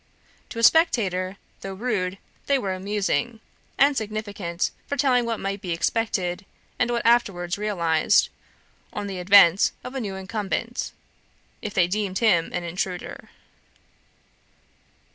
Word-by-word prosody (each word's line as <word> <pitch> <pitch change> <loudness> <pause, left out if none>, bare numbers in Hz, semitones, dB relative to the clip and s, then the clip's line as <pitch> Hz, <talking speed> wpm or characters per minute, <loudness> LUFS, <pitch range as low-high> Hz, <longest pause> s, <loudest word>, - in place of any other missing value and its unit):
To - - -9
a 230 - -2
spectator, 200 - +3 0.2
though 195 0 -6
rude, 195 -4 -2 0.3
they 280 - +3
were 195 -7 -2
amusing, 205 +4 -1 0.4
and 280 +1 +4
significant, 205 -6 -3 0.2
foretelling 255 -4 +2
what 230 -2 -2
might 195 0 -3
be 185 - -6
expected, 180 0 -1 0.4
and 245 - +2
what 235 -1 -1
was 230 - +7
afterwards 175 -7 -1
realised, 170 -7 +2 0.6
on 205 - -4
the 195 -2 -5
advent 190 0 +6
of 250 - -7
a 265 - -3
new 200 -4 -4
incumbent, 210 +4 -3 0.7
if 210 0 -6
they 180 -3 +5
deemed 190 +1 -2
him 190 -8 +3
an 175 - -3
intruder. 180 +1 -5
200 Hz, 130 wpm, -24 LUFS, 185-230 Hz, 0.7 s, was